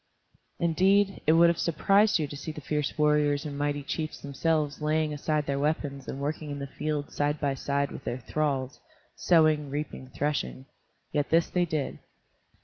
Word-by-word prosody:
Indeed, 190 +4 +3
it 155 - +6
would 170 +1 +6
have 170 - 0
surprised 200 +6 +3
you 155 - -1
to 145 - -8
see 145 +3 -5
the 155 - -8
fierce 150 0 -2
warriors 150 -1 +2
and 145 -2 -5
mighty 145 0 -1
chiefs 155 +2 -4
themselves 150 +1 -1
laying 155 0 +1
aside 150 0 -1
their 140 0 -1
weapons 145 -2 -2
and 135 - -5
working 150 +2 -3
in 145 - -4
the 140 - -4
fields 145 +1 -3
side 145 +1 0
by 140 -2 0
side 140 +1 -1
with - - -8
their 120 - -3
thralls, 135 +1 -2 0.4
sowing, 155 -4 +3
reaping, 145 -2 -5
threshing. 140 0 -2 0.5
Yet 145 -1 0
this 165 +1 +3
they 180 -1 +2
did. 155 -4 -3
150 Hz, 175 wpm, -28 LUFS, 140-155 Hz, 0.5 s, it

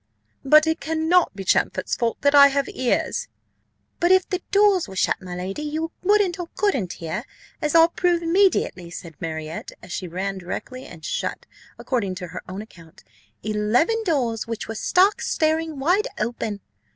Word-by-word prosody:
"But 305 +3 +6
it 320 0 0
cannot 320 - +2
be 195 - -6
Champfort's - - +1
fault 235 -1 -1
that 285 0 +3
I 280 -1 +9
have 280 0 0
ears." 255 - -1 0.7
"But 345 0 +3
if 375 -1 +5
the 370 -2 -2
doors 400 -3 +4
were 190 - -10
shut, 185 - +1
my 180 -1 -7
lady, 185 +8 -4
you 310 +2 -3
wouldn't 395 -2 +2
or 350 - -4
couldn't 265 - 0
hear 170 +7 -5 0.4
as 300 0 0
I'll 330 0 +7
prove 345 0 +1
immediately," 335 - +2
said 170 -1 -9
Marriott, 160 -1 -5
and - - -13
she 180 - -4
ran 190 +3 -3
directly 255 +8 -6
and 160 -1 -11
shut, - - -3 0.3
according 205 -8 -2
to 180 -2 -7
her 180 - -7
own 190 +3 -5
account, 170 -5 -17 0.4
"eleven 215 - +1
doors 245 - 0
which 230 -1 -5
were 225 - -4
stark 365 - +3
staring 315 -1 0
wide 355 +10 +2
open." 215 -2 -3
270 Hz, 170 wpm, -23 LUFS, -, 0.7 s, I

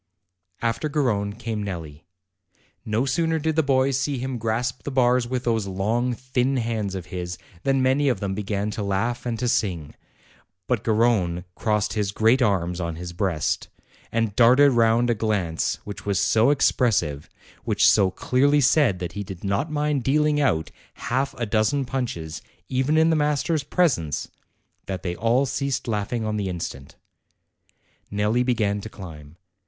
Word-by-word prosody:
After 115 +6 0
Garrone 110 -9 0
came 110 -1 -4
Nelli. 85 -5 -7 0.8
No 110 +4 0
sooner 160 +4 +1
did 160 0 -1
the 160 - +4
boys 135 -2 +2
see 135 0 -1
him 130 0 -4
grasp 115 +3 -1
the - - -5
bars 125 -2 +2
with 125 0 -2
those 115 -4 0
long, 110 +6 0
thin 130 +2 -1
hands 110 -5 -2
of 90 -2 -5
his, 90 -1 -4 0.2
than 135 +2 +1
many 135 +2 +3
of 125 - 0
them 100 -2 -2
began 105 +1 -2
to 105 - -4
laugh 115 +5 -1
and 115 -1 -2
to 125 - -1
sing; 90 -10 -1 0.7
but 120 -3 -1
Garrone 105 -6 +2
crossed 105 -2 0
his 105 -2 -1
great 115 +5 +3
arms 90 -6 +1
on 85 -1 -3
his 85 +1 -7
breast, 85 -4 -1 0.4
and 115 -3 0
darted 130 +4 +6
round 120 0 +3
a - - +3
glance 105 -7 -1
which 105 - -7
was 100 -2 0
so 115 +4 +3
expressive, 110 - +1 0.3
which - - +3
so 100 -3 +5
clearly 140 +9 +2
said 140 -7 +3
that 90 -2 -5
he 100 +4 -5
did 95 -2 -9
not 100 +10 -1
mind 150 -3 0
dealing 150 +2 +2
out 80 - +1 0.2
half 135 +2 -2
a 120 - -1
dozen 115 +6 +1
punches, 115 -12 -4 0.3
even 130 +4 +1
in 160 +1 +4
the - - +3
master's 150 +1 +1
presence, 130 - 0 0.6
that 95 -2 -4
they 90 -1 -2
all 115 +7 +2
ceased 140 0 -2
laughing 110 +1 -2
on 105 0 -1
the 100 -2 -2
instant. 80 -6 -6 1.1
Nelli 105 +4 +1
began 105 -5 0
to 110 - -7
climb. 80 -6 -11
115 Hz, 165 wpm, -24 LUFS, 100-130 Hz, 1.1 s, darted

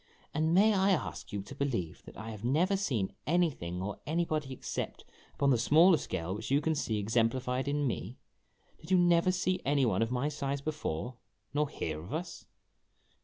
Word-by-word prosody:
" - - -32
And 155 +2 +1
may 205 +5 +5
I 195 0 +3
ask 185 -5 -1
you 100 -1 -3
to - - -10
believe 115 - -2
that - - -12
I 110 +1 -6
have 105 -1 -9
never 165 +11 +2
seen 125 - -1
anything 140 - 0
or 100 +1 -4
anybody 155 -3 -1
except 130 - -5 0.3
upon 140 -1 +3
the 120 - +3
smaller 160 +8 +6
scale 90 - -3
which 110 +2 -5
you 140 +2 +4
can 160 +2 0
see 115 -8 -1
ex 105 +2 -3
emplified 125 +3 +1
in 145 0 0
me? 125 0 -3 0.6
Did 160 - -13
you 185 - +5
never 175 0 +4
see 185 0 0
any 140 -1 +2
one 100 -4 +1
of 115 - +1
my 125 +3 0
size 140 -2 -2
before, 130 - -3 0.4
nor 150 0 +1
hear 80 - -4
of 95 - -6
us 175 +3 -6
140 Hz, 195 wpm, -31 LUFS, 115-160 Hz, 0.6 s, smaller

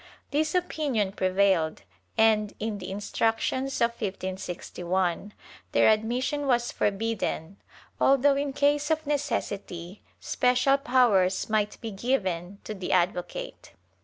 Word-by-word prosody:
This 305 +3 0
opinion 285 - 0
prevailed 185 -4 +1 0.3
and, 215 -2 +3
in 215 -1 -3
the 185 0 -7
Instructions 225 +6 -1
of 235 0 +4
1561, 185 -2 -3 0.4
their - - +5
admission 250 +6 0
was 240 -2 +2
forbidden, 200 -4 -2 0.4
although 275 +1 +4
in 280 0 -1
case 290 +2 +1
of 315 0 0
necessity, 205 -10 -3 0.2
special 255 +2 +2
powers 225 -9 +2
might 210 -1 0
be 225 - -5
given 195 -5 -2
to 215 - -5
the 190 -3 -5
advocate. 185 - -1
220 Hz, 110 wpm, -27 LUFS, 190-270 Hz, 0.4 s, their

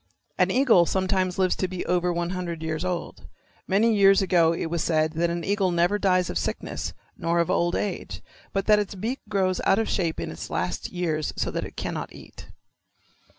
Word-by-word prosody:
An - - +4
eagle 235 -10 +4
sometimes 185 -1 0
lives 185 -1 +2
to 185 - 0
be 180 -1 -5
over 180 0 +1
one 175 0 -2
hundred 175 -3 -4
years 160 0 -2
old. 180 -2 -4 0.4
Many 220 +4 +3
years 195 -1 +6
ago 175 -4 +3
it 165 - -2
was 165 0 -2
said 155 -1 +1
that 170 +1 +1
an 170 0 -3
eagle 200 0 +1
never 175 +4 +2
dies 185 -3 +2
of 80 - -2
sickness - - -4 0.2
nor 170 +1 -1
of 170 - +1
old 175 0 +1
age, 200 -3 -4 0.3
but 195 0 -1
that 210 -1 +5
its 205 -1 -3
beak 225 +8 -3
grows 190 -3 +1
out 195 - +4
of 225 - 0
shape 170 -4 -1
in - - -4
its - - -7
last - - -2
years 160 -4 -2
so - - -1
that - - -3
it - - -11
cannot - - -4
eat. - - -13
180 Hz, 200 wpm, -25 LUFS, 170-195 Hz, 0.4 s, years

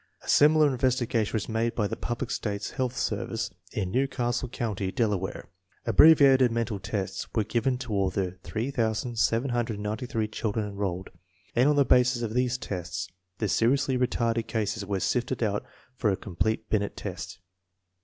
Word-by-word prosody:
A - - -14
similar 155 +1 +6
in 135 -3 -1
vestigation 120 -4 +1
was 110 - -1
made 115 +1 -1
by 105 - +1
the - - -2
United 120 +1 -4
States 100 -2 -3
Public - - -15
Health 130 -1 -1
Service - - -2 0.2
in 95 -4 -2
New 130 +5 +2
Castle 125 -1 -2
County, 105 -6 -3
Delaware. 100 -5 -1 0.4
Abbreviated 135 -5 +6
mental 115 -3 -1
tests 95 0 -3
were 110 - +3
given 120 +4 0
to 120 -4 -5
all 100 -2 +2
the 95 -1 -2
8798 115 0 -1
children 105 -1 -2
enrolled, 95 -2 -4 0.4
and 125 +4 +4
on 150 - +3
the 140 -1 +4
basis 125 -1 +3
of 110 -1 -3
these 125 0 +1
tests 90 -4 -5 0.3
the 110 - -1
seriously 130 +6 +2
retarded 120 -2 0
cases 110 -1 -2
were 100 -1 -2
sifted 120 +6 0
out 105 -2 0 0.3
for 125 -4 +1
a 95 - +1
com 95 -5 -10
plete 110 +4 0
Binet 100 -2 0
test. 90 - -6
115 Hz, 165 wpm, -27 LUFS, 105-125 Hz, 0.4 s, similar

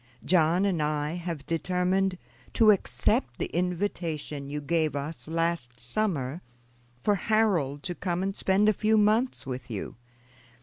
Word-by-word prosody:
John 175 +2 +3
and 180 -6 +1
I 150 0 0
have 170 -4 -5
determined 180 +2 0 0.4
to 220 -2 +6
accept 130 -10 0
the - - -4
invitation 165 -5 -2
you 150 +1 -3
gave 155 0 0
us 145 +3 -5
last 165 -7 -1
summer 140 - -2 0.6
for 205 - +3
Harold 190 -9 +1
to 175 - -3
come 175 0 -2
and 195 0 -2
spend 195 +2 +2
a 215 - +5
few 215 +2 +2
months 215 +4 +2
with 125 -2 -6
you. 105 -1 -5
170 Hz, 140 wpm, -28 LUFS, 150-195 Hz, 0.6 s, to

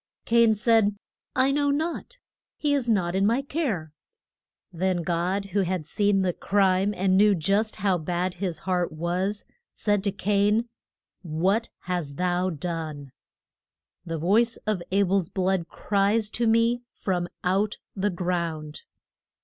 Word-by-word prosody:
Cain 230 -1 +4
said, 215 -1 +3 0.4
I 260 +1 +3
know 285 0 +1
not. 325 +11 -2 0.4
He 295 -1 +1
is 265 -4 0
not 180 -6 +1
in 190 +1 +1
my 235 +6 +2
care. 225 - -2 0.8
Then 180 0 0
God, 175 +4 -1
who 205 - +2
had 180 -3 -2
seen 200 +2 +1
the 180 -1 +1
crime, 195 +1 +2
and 185 0 +2
knew 205 +1 +5
just 200 +6 0
how 190 -3 +1
bad 175 +3 -2
his 180 -2 -3
heart 180 -2 -1
was, 180 +6 -2 0.3
said 205 -2 +1
to 200 - +2
Cain: 205 +4 +1 0.5
What 190 +7 0
hast 175 -6 -3
thou 180 +1 +1
done? 155 -4 -5 0.9
The 165 -2 -4
voice 220 +8 +2
of 210 -4 0
A 200 +1 +4
bel's 190 -2 +1
blood 185 -2 0
cries 205 +1 +1
to 235 -1 0
me 230 +2 +3
from 175 -2 -2
out 195 +3 +1 0.2
the 200 +1 0
ground. 170 -4 -3
190 Hz, 140 wpm, -26 LUFS, 175-215 Hz, 0.9 s, knew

